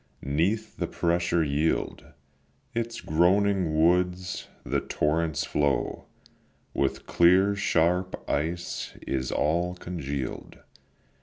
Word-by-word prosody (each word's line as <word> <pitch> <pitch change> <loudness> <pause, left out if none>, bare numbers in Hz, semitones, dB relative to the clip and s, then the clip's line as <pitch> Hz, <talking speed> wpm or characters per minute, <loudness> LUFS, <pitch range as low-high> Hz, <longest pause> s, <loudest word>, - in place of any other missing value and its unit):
'neath 90 +11 0
the - - -1
pressure 85 0 +1
yield 75 +2 0 0.7
Its 115 0 -3
groaning 90 0 +2
woods; 90 +2 +1 0.2
the - - 0
torrents' 80 +1 0
flow 70 -4 0 0.7
With 70 - -1
clear 95 +4 +4
sharp 90 -1 +1
ice 85 +4 -2
is 65 -1 -2
all 85 +4 +1
congeal'd. 70 -7 -5
85 Hz, 90 wpm, -27 LUFS, 75-90 Hz, 0.7 s, clear